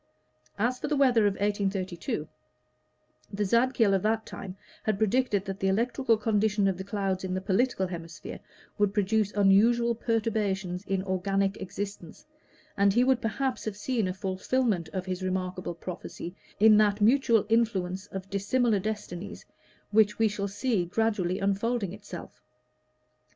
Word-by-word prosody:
As 240 +4 0
to - - -3
the 300 - 0
weather 245 -6 +4
of 200 - +1
1832, 195 -6 -2 1.0
the 205 +1 -1
Zadkiel 235 -1 +3
of 190 - +2
that 220 +2 0
time 190 -1 -8 0.2
had 215 -2 0
predicted 215 -2 +1
that 195 0 -5
the 195 - 0
electrical 230 +4 +2
condition 210 -1 +1
of 190 -2 -1
the - - -3
clouds 195 -2 -2
in 185 -1 -2
the - - 0
political 190 +2 +1
hemisphere 165 -3 -7 0.4
would 205 -1 +2
produce 210 0 +1
unusual 225 +4 +4
perturbations 210 -5 -1
in 195 -1 0
organic 195 +1 0
existence, 200 +2 -6 0.5
and 200 0 +4
he 240 +3 +4
would 260 -1 +2
perhaps 250 +3 -2
have 210 -2 -4
seen 225 -2 -1
a 185 - -2
fulfillment 190 -1 -1
of 185 -1 -3
his 185 0 -4
remarkable 185 -1 -3
prophecy 175 0 -7 0.2
in 215 0 +7
that 210 -1 +3
mutual 230 -1 +4
influence 205 -4 0
of 190 -1 -7
dissimilar 205 +3 +1
destinies 205 -3 -5 0.5
which 210 -1 +4
we 225 - +4
shall 200 -1 -2
see 205 0 0
gradually 190 -1 0
unfolding 200 0 -1
itself. 200 -4 -10
205 Hz, 145 wpm, -28 LUFS, 190-225 Hz, 1.0 s, in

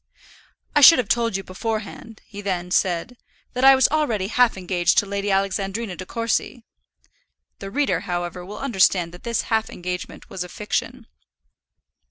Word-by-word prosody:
"I 295 - +5
should 330 +4 +10
have 240 -5 -1
told 230 -4 +1
you 195 - -6
beforehand," 220 +2 -6
he 205 -1 -9
then 180 -3 -3
said, 185 +7 0 0.4
"that 250 - -2
I 270 0 +9
was 260 -1 +4
already 235 -11 0
half 245 -2 +3
engaged 175 -2 0
to - - +4
Lady 200 0 -3
Alexandrina 195 +1 -1
De 185 - -9
Courcy." 230 +1 -2 1.0
The 195 - -7
reader, 280 +6 0
however, 175 0 -4
will 205 +4 -9
understand 190 -9 +2
that 175 - -12
this 235 -1 -1
half 220 0 +1
engagement 180 +1 -6
was 185 - -5
a 180 - -10
fiction. 230 +5 -4
200 Hz, 160 wpm, -22 LUFS, 185-235 Hz, 1.0 s, should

